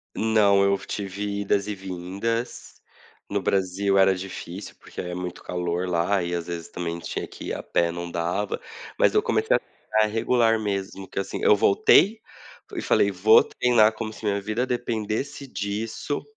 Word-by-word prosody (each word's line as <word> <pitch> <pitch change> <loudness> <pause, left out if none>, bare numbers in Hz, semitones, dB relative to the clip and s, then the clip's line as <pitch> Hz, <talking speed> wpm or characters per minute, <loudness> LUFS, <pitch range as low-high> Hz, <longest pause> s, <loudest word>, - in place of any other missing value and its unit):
Não. 105 -3 +4
Eu 100 0 +3
tive 100 0 -4
idas 100 0 +1
e 105 - -3
vindas. 95 +5 -4 0.6
No - - -1
Brasil 95 +1 +1
era 95 0 +5
difícil, 95 0 -7
porque - - -11
é 90 0 -5
muito 90 0 -6
calor 90 0 -2
lá, 90 +2 +1
e 85 0 -3
às 85 -1 -3
vezes, 85 -1 -5
também 85 -1 -4
tinha - - -4
que - - -10
ir - - -2
a - - -4
pé 85 0 +1
não 85 0 -5
dava. 85 +4 -2 0.4
Mas, - - +4
eu 425 - +4
comecei 450 +1 +2
a - - +2
ficar 110 0 -1
regular 115 +1 +2
mesmo 100 -2 -3
que - - -4
assim. 100 - -4
Eu - - +6
voltei, 190 - +4 0.6
e - - -2
falei: 100 - +3
"Vou 100 +4 +6
treinar 115 -3 +3
como 110 0 -5
se 110 - -10
minha 100 -1 0
vida 110 +5 -1
dependesse 120 +3 -3
disso" 110 +5 -3
100 Hz, 170 wpm, -25 LUFS, 90-110 Hz, 0.6 s, Eu